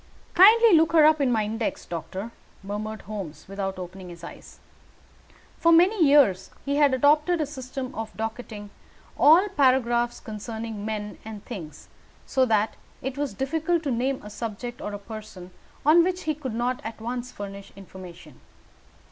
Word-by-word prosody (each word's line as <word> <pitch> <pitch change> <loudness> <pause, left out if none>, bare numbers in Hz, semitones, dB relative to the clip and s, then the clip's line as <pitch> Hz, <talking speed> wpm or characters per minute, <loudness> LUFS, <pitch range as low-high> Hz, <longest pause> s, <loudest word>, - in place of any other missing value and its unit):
"Kindly 440 +4 +7
look 325 0 +4
her 315 -2 +7
up 310 -1 +4
in 265 -3 +2
my 220 -2 +2
index, 220 +2 -3
doctor," 185 +6 -6 0.3
murmured 210 +2 -5
Holmes, 195 -7 -7
without 195 -1 -4
opening 185 0 -8
his 170 -1 -12
eyes. 175 - -11 1.0
For 335 - +4
many 355 +3 +5
years 265 - +4 0.2
he 280 0 0
had 285 -3 +4
adopted 300 +6 +3
a 305 - +1
system 265 -2 -6
for 225 -2 -4
docketing 220 -2 -6 0.4
all 335 +7 +6
paragraphs 255 -7 +2
concerning 220 -1 -6
men 210 -1 -5
and 215 -2 -9
things, 160 - -9 0.4
so 260 -1 +2
that 220 -2 +1 0.3
it 265 0 -3
was 285 -1 -3
difficult 320 +5 -1
to 280 - -1
name 260 +3 -1
a 210 - -9
subject 235 +3 -6
or 210 - -4
a - - -3
person 205 -3 -10 0.3
on 325 +3 +6
which 365 +1 -2
he 310 - 0
could 270 -6 -6
not 245 +2 -1
at 225 +1 -7
once 245 +2 -5
furnish 200 -1 -8
information. 180 -6 -12
235 Hz, 160 wpm, -25 LUFS, 205-290 Hz, 1.0 s, Kindly